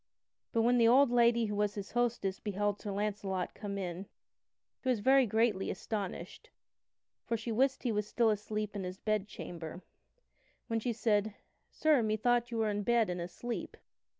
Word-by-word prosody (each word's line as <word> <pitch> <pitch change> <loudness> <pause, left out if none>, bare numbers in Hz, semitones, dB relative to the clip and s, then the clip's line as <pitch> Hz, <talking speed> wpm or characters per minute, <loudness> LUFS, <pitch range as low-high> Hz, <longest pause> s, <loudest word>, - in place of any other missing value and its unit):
But 230 - +2
when 245 +1 +4
the 230 - +6
old 255 +2 +6
lady 235 -1 +4
who 210 -1 -3
was 205 0 0
his 200 -1 -6
hostess 235 -5 0
beheld 205 0 -1
Sir 205 - -4
Launcelot 200 -2 -2
come 200 -1 -5
in, 185 0 -4 0.7
she 260 - -2
was 245 -4 +2
very 265 +3 +5
greatly 220 -2 +1
astonished, 200 -1 -5 0.7
for 230 - -1
she 230 +1 -5
wist 265 +4 +1
he 245 - +1
was 210 -1 -1
still 230 0 +3
asleep 210 0 -3
in 200 - -3
his 185 +1 -5
bed 215 -1 -1
chamber. 170 -3 -8 0.8
Wherefore 225 -1 -1
she 240 +1 -1
said: 215 -2 +1 0.3
"Sir, 305 -5 +3
methought 235 +2 +1
you 235 - -4
were 220 -1 +1
in 205 0 -1
bed 230 -2 +2
and 175 0 -3
asleep." 230 +7 -5
215 Hz, 175 wpm, -32 LUFS, 200-235 Hz, 0.8 s, the